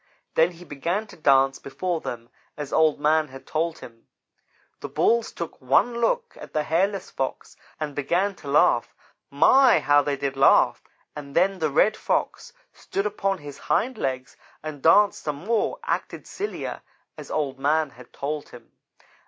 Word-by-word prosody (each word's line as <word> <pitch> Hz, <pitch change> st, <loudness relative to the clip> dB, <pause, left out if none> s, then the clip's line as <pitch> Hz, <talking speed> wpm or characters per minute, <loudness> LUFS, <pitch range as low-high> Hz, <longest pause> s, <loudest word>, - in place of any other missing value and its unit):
Then 165 Hz, +2 st, +3 dB
he 175 Hz, +1 st, -13 dB
began 170 Hz, +8 st, -2 dB
to -, -, -14 dB
dance 135 Hz, -3 st, +3 dB
before 170 Hz, +4 st, -3 dB
them 120 Hz, 0 st, -7 dB, 0.3 s
as 145 Hz, -2 st, -6 dB
Old 155 Hz, -2 st, +3 dB
man 155 Hz, +1 st, +2 dB
had 135 Hz, -1 st, -12 dB
told 165 Hz, +1 st, -2 dB
him. 115 Hz, -1 st, -14 dB, 0.7 s
The -, -, -7 dB
Bulls 235 Hz, 0 st, +1 dB
took 170 Hz, -4 st, -7 dB
one 235 Hz, -, +2 dB
look 475 Hz, -, 0 dB
at -, -, -11 dB
the 155 Hz, -, 0 dB
hairless 190 Hz, +5 st, 0 dB
Fox 135 Hz, -, -4 dB, 0.2 s
and 150 Hz, -2 st, -3 dB
began 175 Hz, +8 st, 0 dB
to 145 Hz, -, -12 dB
laugh. 140 Hz, +2 st, +3 dB, 0.3 s
My! 245 Hz, -, +5 dB
How 145 Hz, 0 st, +4 dB
they 145 Hz, -1 st, -2 dB
did 135 Hz, 0 st, -3 dB
laugh, 135 Hz, -, +4 dB, 0.3 s
and 145 Hz, -2 st, -9 dB
then 190 Hz, +2 st, +2 dB
the 155 Hz, -2 st, +1 dB
Red 210 Hz, +9 st, +3 dB
Fox 485 Hz, -, -2 dB, 0.2 s
stood 195 Hz, -, -4 dB
upon 195 Hz, -2 st, -1 dB
his 145 Hz, -3 st, -10 dB
hind 255 Hz, +3 st, 0 dB
legs 130 Hz, -2 st, -3 dB, 0.3 s
and 155 Hz, -3 st, -7 dB
danced 200 Hz, +6 st, +4 dB
some 150 Hz, -2 st, -3 dB
more; 225 Hz, 0 st, 0 dB
acted -, -, -3 dB
sillier, 415 Hz, +2 st, -5 dB, 0.3 s
as -, -, -10 dB
Old 135 Hz, -3 st, -2 dB
man 150 Hz, +1 st, +1 dB
had 125 Hz, -1 st, -16 dB
told 145 Hz, +1 st, -4 dB
him. 120 Hz, -1 st, -14 dB
155 Hz, 165 wpm, -24 LUFS, 140-195 Hz, 0.7 s, My